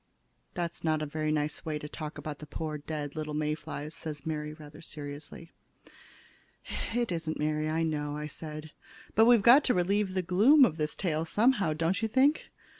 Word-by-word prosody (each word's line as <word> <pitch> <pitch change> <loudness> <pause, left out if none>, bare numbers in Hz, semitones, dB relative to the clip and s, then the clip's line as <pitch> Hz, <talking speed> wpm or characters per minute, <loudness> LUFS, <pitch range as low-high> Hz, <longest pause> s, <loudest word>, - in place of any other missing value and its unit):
"That's 170 -1 -3
not 155 -1 +1
a - - -1
very 155 +1 -2
nice 150 0 -1
way 155 -1 -2
to 150 - -7
talk 155 0 -7
about 150 -2 -6
the 150 - -9
poor 150 0 -4
little 150 0 -4
dead - - 0
May 150 0 0
flies," 150 0 -6
said 150 -3 -7
Mary, 150 -1 -3
rather 150 -1 -12
seriously. 150 +2 -8 1.4
"It 240 -4 0
isn't, 165 -2 -2
Mary, 155 0 0
I 160 +1 0
know," 150 -1 -2
said 155 0 -8
I. - - -43 0.3
"But 220 - +6
we've 235 -3 +6
got 260 +6 +8
to 250 - +3
relieve 190 +2 +1
the 185 - +1
gloom 225 - +6
of 160 -8 -2
this 150 -1 -1
tale 160 -5 -1
someway, 205 -2 +2
don't 165 +6 0
you 225 - +1
think? 265 +7 +3
155 Hz, 190 wpm, -30 LUFS, 150-185 Hz, 1.4 s, got